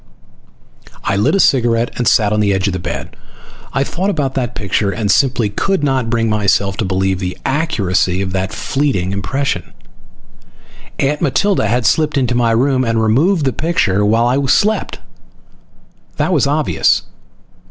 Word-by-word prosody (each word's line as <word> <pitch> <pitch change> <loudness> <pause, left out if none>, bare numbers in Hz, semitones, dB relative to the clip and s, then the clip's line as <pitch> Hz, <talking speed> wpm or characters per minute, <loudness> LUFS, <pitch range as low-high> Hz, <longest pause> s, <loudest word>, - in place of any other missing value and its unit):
I - - 0
lit 105 - +2
a - - +1
cigarette 120 -6 +2
and 120 - -1
sat 105 -2 +3
on 105 - +1
the 100 -2 +2
edge 95 +1 -1
of 100 - 0
the 90 - -3
bed. - - -6 0.6
I 135 - 0
thought 185 +7 -2
about 145 -8 -1
that 125 -3 -3
picture, 100 +1 -1
and 100 0 -1
simply 125 -4 +2
could 170 - -1
not 130 -4 0
bring 115 -1 0
myself 100 -2 +1
to 110 - -1
believe 95 0 0
the 90 -1 -4
accuracy 100 - 0
of 95 -1 -3
that 95 0 -2
fleeting 135 -11 -1
impression. 100 +1 -3 1.2
Aunt 145 +2 -1
Matilda 200 - +1
had 120 +2 0
slipped 155 +2 +1
into 125 -3 +1
my 120 -1 +2
room 130 +3 +2
and 115 -2 0
removed 145 - +2
the 130 - 0
picture 150 - 0
while 115 +3 +2
I 130 +3 +1
slept. 210 +10 +1 1.2
That - - 0
was - - +2
obvious. - - +1
115 Hz, 165 wpm, -16 LUFS, 100-140 Hz, 1.2 s, sat